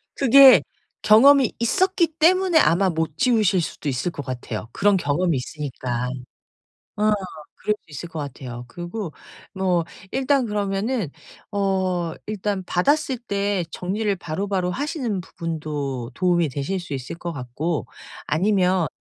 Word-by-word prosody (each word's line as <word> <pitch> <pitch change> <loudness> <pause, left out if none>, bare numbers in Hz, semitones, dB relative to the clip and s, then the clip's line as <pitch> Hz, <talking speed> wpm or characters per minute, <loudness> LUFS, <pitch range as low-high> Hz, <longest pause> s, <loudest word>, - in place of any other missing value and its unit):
그게 275 0 +8 0.4
경험이 265 +3 +6
있었기 345 +6 +2
때문에 360 +1 +4
아마 190 - +3
못 160 -2 -2
지우실 215 -7 +3
수도 150 - -4
있을 135 +6 -2
것 145 - -7
같아요. 120 -3 -5
그런 200 0 +3
경험이 165 0 0
있으니까. 125 -3 -4 0.9
어 215 +1 +2 0.5
그럴 210 - 0
수 - - -20
있을 155 +4 -7
것 165 -3 -6
같아요. 125 -4 -7
그리고 175 - -6 0.4
뭐 185 -3 +1 0.3
일단 270 0 +2
그러면은 205 - -1 0.4
어 190 -4 0
일단 205 -2 -2
받았을 280 - +1
때 200 -4 -1
정리를 205 +3 -1
바로바로 185 +2 -2
하시는 260 - -2
부분도 150 -7 -4
도움이 175 -2 +2
되실 145 +8 -3
수 175 -4 -7
있을 135 +4 -5
것 170 0 -5
같고 140 +2 -3 0.4
아니면 185 0 +2
185 Hz, 280 characters per minute, -23 LUFS, 155-215 Hz, 0.9 s, 그게